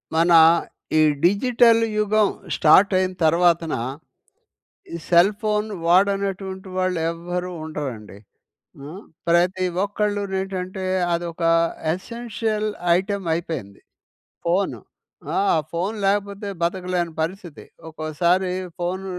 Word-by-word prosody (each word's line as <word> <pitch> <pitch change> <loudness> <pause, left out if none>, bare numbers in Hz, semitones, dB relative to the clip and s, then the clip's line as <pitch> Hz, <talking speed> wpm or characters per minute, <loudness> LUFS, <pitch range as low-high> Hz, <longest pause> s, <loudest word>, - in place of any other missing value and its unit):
మన 170 +2 +3 0.7
ఈ - - +5 0.2
డిజిటల్ 230 +4 +4 0.2
యుగం 210 0 +2 0.3
స్టార్టయిన 185 +3 +4
తర్వాతన 170 0 +3 1.2
ఈ - - -2
సెల్ 175 +4 +5
ఫోన్ 210 -1 0 0.2
వాడనటువంటి 190 +1 +1
వాళ్ళు 185 -1 0
ఎవ్వరూ 175 +2 -5
ఉండరండి. 135 -10 -6 0.7
ఆ! - - -8 0.4
ప్రతి 180 +2 +2 0.2
ఒక్కళ్ళు 205 0 -1
నేంటంటే 190 0 -4 0.3
అదొక 170 0 -4 0.5
ఎసెన్షియల్ 220 +1 -3 0.3
ఐటెమ్ 195 0 -3
అయిపోయింది 160 - -5 0.7
ఫోను. 185 +3 0 0.5
ఆ! - - -1 0.2
ఆ - - +2 0.2
ఫోన్ 185 +6 -1
లేకపోతే 200 +1 -1
బతకలేని 175 -1 -1
పరిస్థితి. 175 -1 -6 0.3
ఒకోసారి 170 +4 0 0.3
ఫోన్ 185 +2 -3
185 Hz, 95 wpm, -22 LUFS, 170-200 Hz, 1.2 s, ఈ